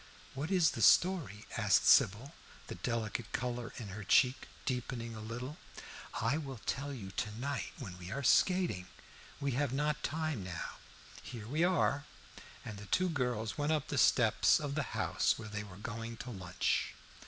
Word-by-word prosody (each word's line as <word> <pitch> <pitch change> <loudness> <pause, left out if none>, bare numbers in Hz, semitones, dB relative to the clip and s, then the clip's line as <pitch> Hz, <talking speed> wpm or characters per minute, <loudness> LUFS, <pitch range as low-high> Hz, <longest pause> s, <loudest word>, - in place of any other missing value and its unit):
"What 140 +4 -3
is 180 -4 +4
the - - -4
story?" 170 - +4
asked - - +4
Sybil, 120 - +5 0.3
the - - -6
delicate 115 -2 -3
color 120 -1 -2
in 110 -5 -6
her 100 +2 -6
cheek 125 +7 +4 0.2
deepening 125 -2 -3
a - - -7
little. 120 +6 -6 0.6
"I 125 +8 +1
will 135 -4 -6
tell 140 +1 -2
you 105 -8 -7
to 105 +2 -3
night 140 +2 -2
when 90 -2 -8
we 90 0 -8
are 140 +7 -3
skating, 170 - +3 0.5
we 140 0 0
have 140 +1 0
not 150 +2 0
time 155 -8 -2
now. 90 -3 -5 0.4
Here 110 -4 -8
we 150 +7 +1
are." 155 -5 +2 0.6
And 105 -2 -6
the 105 - -9
two 185 0 +2
girls 125 -6 -1
went 145 +2 +2
up 150 -3 -1
the 140 - -2
steps 115 -3 +5
of 145 -2 -3
the 155 - 0 0.2
house - - +2
where 110 - -7
they 105 0 -4
were 95 -3 -11
going 115 +2 -5
to 125 - -7
lunch. 90 -4 -1
125 Hz, 175 wpm, -34 LUFS, 110-145 Hz, 0.6 s, Sybil